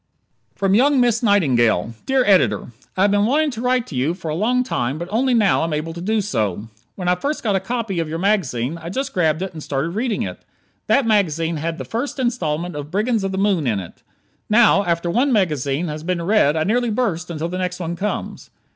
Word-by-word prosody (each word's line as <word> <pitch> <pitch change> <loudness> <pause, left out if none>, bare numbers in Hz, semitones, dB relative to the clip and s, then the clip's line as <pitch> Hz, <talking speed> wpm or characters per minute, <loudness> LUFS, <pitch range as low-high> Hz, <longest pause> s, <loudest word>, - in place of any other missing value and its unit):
From 195 -1 +1
Young 270 +5 +4
Miss 240 -2 +2
Nightingale 125 - +2
Dear 265 -1 +3
Editor: 190 -9 +3 0.3
I 185 - +3
have 200 - +4
been 205 +1 +3
wanting 295 +4 +2
to 230 -2 -6
write 250 -1 +1
to - - -9
you 140 +7 0
for 165 -3 -6
a - - -1
long 245 +7 +1
time 135 - -2
but 170 +2 -5
only 250 +3 +2
now 205 -8 +3
am 165 -1 -2
I - - +1
able 160 +2 -4
to 170 - -7
do 215 +4 +1
so. 110 - -2 0.3
When 180 -2 -5
I 180 - +4
first 280 +12 -3
got 210 -4 +1
a - - +2
copy 225 -2 -3
of 165 -2 -2
your 160 - -3
magazine 165 - 0
I 165 +1 -7
just 265 +7 -3
grabbed 160 -1 +1
it 190 -1 -5
and 160 - -8
started 140 +2 -2
reading 220 +5 -1
it. - - -7 0.4
That 275 - +3
magazine 165 -7 +1
had 165 +2 -3
the - - -6
first 245 +6 -3
installment 180 - -2
of 145 0 -6
"Brigands 215 +4 0
of 195 - -1
the 190 - -3
Moon" 190 -7 +1
in 105 -4 +1
it. 90 - -10 0.5
Now, 215 -2 +5
after 170 0 0
one 260 +8 +2
magazine 155 - 0
has 150 0 -5
been 180 +2 -2
read 175 -6 +3
I 155 - +1
nearly 240 +6 +1
burst 195 -7 -1
until 165 0 -3
the 180 +1 -4
next 180 0 -3
one 170 -1 -3
comes. 205 +4 -4
185 Hz, 230 wpm, -20 LUFS, 160-225 Hz, 0.5 s, Now